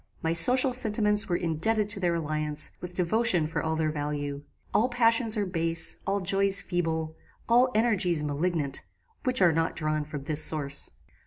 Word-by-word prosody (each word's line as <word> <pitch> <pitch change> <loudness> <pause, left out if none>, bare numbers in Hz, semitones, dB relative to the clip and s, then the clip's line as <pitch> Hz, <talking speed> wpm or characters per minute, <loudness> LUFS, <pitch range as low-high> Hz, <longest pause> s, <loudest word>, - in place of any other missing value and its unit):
My 165 0 0
social 250 +10 +6
sentiments 210 -3 +2
were 175 - 0
indebted 175 +7 0
to 205 -1 +1
their 175 -2 -1
alliance 155 -1 -2
with 180 0 -9
devotion 185 -1 +1
for 155 0 -4
all 160 0 -2
their 155 -1 -1
value. 145 -1 -5 0.3
All 240 +4 +2
passions 230 -2 +1
are 205 - -1
base, 165 -2 0
all 200 +1 -1
joys 195 +1 +2
feeble, 160 -3 -3 0.3
all 245 +2 +3
energies 185 -8 +1
malignant, 150 0 -3 0.4
which 255 -6 +2
are 170 -2 +4
not 165 +1 -1
drawn 155 -1 -2
from 150 -2 -8
this 155 +1 -1
source. 140 -3 0
170 Hz, 165 wpm, -26 LUFS, 155-210 Hz, 0.4 s, social